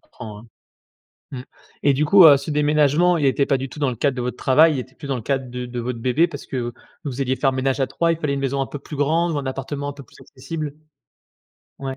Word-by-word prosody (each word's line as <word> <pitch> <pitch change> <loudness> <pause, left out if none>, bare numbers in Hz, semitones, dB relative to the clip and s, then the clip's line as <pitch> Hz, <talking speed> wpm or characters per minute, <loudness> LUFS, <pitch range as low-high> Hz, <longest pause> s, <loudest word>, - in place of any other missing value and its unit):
comprends, 105 -3 -11
hein. 115 - -16 0.8
Mmh, 130 -2 -6 0.4
et 145 - +4
du 150 +3 +1
coup, 190 +2 +7
heu, 145 -3 +9
ce 140 - -6
déménagement 150 +3 +3
il 145 - +1
était 135 +1 +2
pas 135 -1 +1
du 135 +1 -5
tout 140 - -12
dans 140 -3 +1
le 120 - -6
cadre 135 +1 0
de 125 - -2
votre 125 +1 -4
travail, 155 +4 +4
il - - -2
était 130 +1 -7
plus 140 - -10
dans 135 - -1
le - - -5
cadre 135 +1 -2
de 125 0 -5
de 120 0 -6
votre 120 0 -4
bébé 130 +8 +2
parce 145 -5 -9
que 120 -2 -3 0.3
vous 140 -2 -5
alliez 130 0 0
faire 135 +1 +1
ménage 135 +1 -1
à 135 - +2
3, 170 +5 0
il 165 - -3
fallait 150 -3 -1
une 140 - -2
maison 135 0 -1
un 135 - -3
peu 145 - -7
plus 150 - -9
grande 165 +4 +1
ou 150 - -1
un 140 - -4
appartement 140 +2 -4
un - - -4
peu 140 0 -11
plus - - -21
accessible? 150 +2 -6 1.1
Ouais. 135 -1 -5
140 Hz, 270 wpm, -21 LUFS, 130-150 Hz, 1.1 s, heu